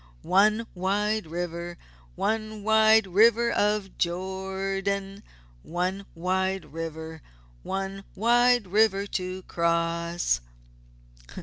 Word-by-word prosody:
One 210 Hz, +4 st, +3 dB
wide 205 Hz, +2 st, 0 dB
river! 170 Hz, +1 st, -5 dB, 0.4 s
One 215 Hz, -, -2 dB
wide 220 Hz, 0 st, +5 dB
river 230 Hz, +5 st, +4 dB
of 210 Hz, -3 st, 0 dB
Jordan! 195 Hz, +2 st, -2 dB, 0.4 s
One 185 Hz, -, -3 dB
wide 190 Hz, +1 st, -1 dB
river! 160 Hz, -1 st, -6 dB, 0.4 s
One 195 Hz, -, -4 dB
wide 240 Hz, +1 st, +4 dB
river 200 Hz, 0 st, +3 dB
to 185 Hz, -1 st, -4 dB
cross!" 170 Hz, -, 0 dB
195 Hz, 85 wpm, -26 LUFS, 175-210 Hz, 0.4 s, wide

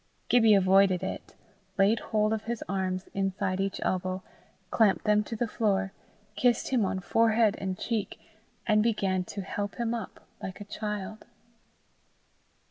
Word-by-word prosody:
Gibbie 225 Hz, -3 st, +6 dB
avoided 190 Hz, -1 st, +4 dB
it, -, -, -6 dB, 0.4 s
laid 205 Hz, +3 st, +4 dB
hold 215 Hz, 0 st, 0 dB
of 220 Hz, -1 st, -3 dB
his 235 Hz, 0 st, -3 dB
arms 185 Hz, -1 st, -2 dB
inside 195 Hz, -1 st, -1 dB
each 195 Hz, 0 st, -1 dB
elbow, 185 Hz, 0 st, -1 dB, 0.5 s
clamped 215 Hz, -4 st, +3 dB
them 210 Hz, 0 st, +4 dB
to 225 Hz, -, -5 dB
the 235 Hz, +2 st, -1 dB
floor, 195 Hz, -3 st, 0 dB, 0.4 s
kissed 245 Hz, -2 st, +2 dB
him 250 Hz, -4 st, +2 dB
on 190 Hz, 0 st, -1 dB
forehead 225 Hz, +1 st, +3 dB
and 190 Hz, -1 st, -3 dB
cheek, 225 Hz, -4 st, -3 dB, 0.5 s
and 215 Hz, -1 st, +4 dB
began 195 Hz, -5 st, +1 dB
to 200 Hz, +1 st, -6 dB
help 205 Hz, +1 st, -4 dB
him 235 Hz, -1 st, -1 dB
up 230 Hz, -5 st, -6 dB, 0.2 s
like 190 Hz, +1 st, -6 dB
a -, -, -6 dB
child. 210 Hz, +1 st, -5 dB
205 Hz, 145 wpm, -28 LUFS, 190-220 Hz, 0.5 s, Gibbie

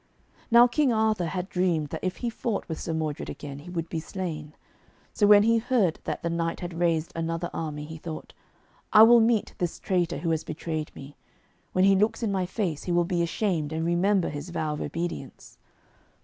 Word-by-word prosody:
Now 235 Hz, 0 st, +8 dB
King 260 Hz, +2 st, +2 dB
Arthur 220 Hz, -5 st, +1 dB
had 180 Hz, +3 st, -3 dB
dreamed 175 Hz, -6 st, 0 dB
that -, -, -6 dB
if 185 Hz, 0 st, -2 dB
he -, -, +1 dB
fought 220 Hz, -2 st, -3 dB
with 160 Hz, -3 st, -5 dB
Sir -, -, -4 dB
Modred 155 Hz, -2 st, -3 dB
again 140 Hz, -1 st, -7 dB
he 160 Hz, +5 st, -11 dB
would 170 Hz, -2 st, -3 dB
be 165 Hz, -, -3 dB
slain. 160 Hz, -3 st, -6 dB, 0.6 s
So 205 Hz, -, +3 dB
when 205 Hz, 0 st, +8 dB
he 230 Hz, +1 st, +4 dB
heard 220 Hz, -8 st, +1 dB
that -, -, -4 dB
the 170 Hz, -, 0 dB
knight 165 Hz, 0 st, -1 dB
had 175 Hz, -1 st, -5 dB
raised 165 Hz, -2 st, +1 dB
another 165 Hz, +1 st, -2 dB
army, 150 Hz, -2 st, -4 dB
he 160 Hz, +1 st, -8 dB
thought, 155 Hz, 0 st, -8 dB, 0.6 s
'I 215 Hz, 0 st, +10 dB
will 235 Hz, +1 st, +8 dB
meet 225 Hz, -1 st, +2 dB
this 175 Hz, -2 st, -2 dB
traitor 175 Hz, -4 st, 0 dB
who 165 Hz, +3 st, -1 dB
has 160 Hz, -1 st, 0 dB
betrayed 155 Hz, -1 st, -4 dB
me. 140 Hz, +1 st, -11 dB, 0.6 s
When 185 Hz, +1 st, +4 dB
he 195 Hz, 0 st, +6 dB
looks 215 Hz, +4 st, +1 dB
in 215 Hz, -, 0 dB
my 190 Hz, -2 st, 0 dB
face, 180 Hz, -6 st, -3 dB
he 180 Hz, -, -2 dB
will 175 Hz, 0 st, +3 dB
be 175 Hz, -1 st, 0 dB
ashamed 170 Hz, -3 st, -1 dB
and 160 Hz, +1 st, -2 dB
remember 180 Hz, +3 st, +2 dB
his 145 Hz, +3 st, -6 dB
vow 155 Hz, -3 st, -2 dB
of 150 Hz, -, -5 dB
obedience.' 165 Hz, -3 st, -5 dB
175 Hz, 205 wpm, -27 LUFS, 160-200 Hz, 0.6 s, I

